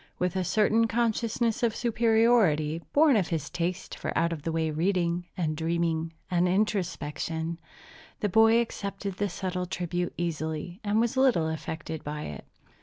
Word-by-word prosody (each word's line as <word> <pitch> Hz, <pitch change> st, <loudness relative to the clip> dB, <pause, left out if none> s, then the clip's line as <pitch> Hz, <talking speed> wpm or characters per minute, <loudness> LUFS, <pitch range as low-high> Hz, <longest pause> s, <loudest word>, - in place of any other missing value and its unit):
With 180 Hz, 0 st, -1 dB
a 185 Hz, -, +1 dB
certain 215 Hz, +5 st, +3 dB
consciousness 230 Hz, 0 st, 0 dB
of 230 Hz, -2 st, +1 dB
superiority, 220 Hz, -9 st, +3 dB
born 295 Hz, -2 st, +5 dB
of 195 Hz, -6 st, +2 dB
his 155 Hz, -3 st, -3 dB
taste 180 Hz, 0 st, -3 dB
for -, -, -4 dB
out 170 Hz, +1 st, +2 dB
of 155 Hz, -, -6 dB
the 165 Hz, -, -2 dB
way 160 Hz, -1 st, 0 dB
reading, 175 Hz, +1 st, 0 dB
and 155 Hz, -4 st, -1 dB
dreaming, 165 Hz, 0 st, -1 dB, 0.2 s
and 175 Hz, 0 st, +3 dB
introspection, 170 Hz, -4 st, -1 dB, 0.6 s
the 210 Hz, -, +1 dB
boy 225 Hz, +3 st, +5 dB
accepted 200 Hz, -4 st, -4 dB
the 205 Hz, 0 st, 0 dB
subtle 180 Hz, 0 st, -3 dB
tribute 175 Hz, 0 st, -3 dB
easily, 165 Hz, +1 st, -3 dB
and 210 Hz, +1 st, +1 dB
was 235 Hz, +3 st, +1 dB
little 250 Hz, -12 st, +4 dB
affected 160 Hz, 0 st, -5 dB
by 150 Hz, +1 st, -4 dB
it. 70 Hz, -3 st, -7 dB
180 Hz, 155 wpm, -28 LUFS, 165-215 Hz, 0.6 s, born